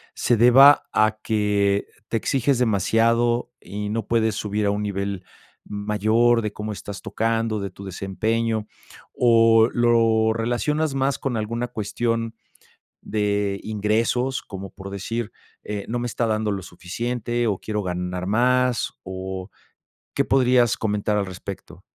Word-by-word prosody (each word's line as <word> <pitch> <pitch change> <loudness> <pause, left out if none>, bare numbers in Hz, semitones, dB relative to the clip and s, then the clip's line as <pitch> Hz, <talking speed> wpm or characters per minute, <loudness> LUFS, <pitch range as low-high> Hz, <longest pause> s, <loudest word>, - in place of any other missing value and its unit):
se 120 - +2
deba 135 +5 +7
a 110 0 +2
que 100 -2 +1 0.2
te 115 - 0
exiges 135 +2 +1
demasiado 115 +2 +2
y 105 +1 -5
no 110 -1 -3
puedes 110 -2 +2
subir 105 -1 -2
a 100 - +2
un 105 +1 -2
nivel 100 -2 -3 0.4
mayor 110 +3 +2
de 105 -1 -3
cómo 105 +1 -5
estás 100 0 -7
tocando, 115 -1 -1
de 100 0 -4
tu 100 +2 -11
desempeño, 110 +4 -2 0.5
o 115 -1 +5
lo 115 -2 +3
relacionas 135 +6 -1
más 135 +1 0
con 125 -4 -2
alguna 115 +3 -2
cuestión 115 +1 -2 0.7
de 100 -2 -1
ingresos, 115 +5 0
como 95 -1 -8
por 100 -1 -9
decir, 110 +3 -4 0.3
eh, 105 -1 -5
no 120 +1 -2
me 120 - -2
está 120 0 -1
dando 110 -1 0
lo 95 -1 -4
suficiente 120 +7 -3
o 100 -3 0
quiero 105 -1 -3
ganar 90 0 -3
más, 125 +3 +2
o 95 0 -6 0.6
¿qué - - +2
podrías 125 -3 +3
comentar 105 -1 -1
al 100 -2 0
respecto? 95 -1 -9
110 Hz, 140 wpm, -23 LUFS, 100-120 Hz, 0.7 s, deba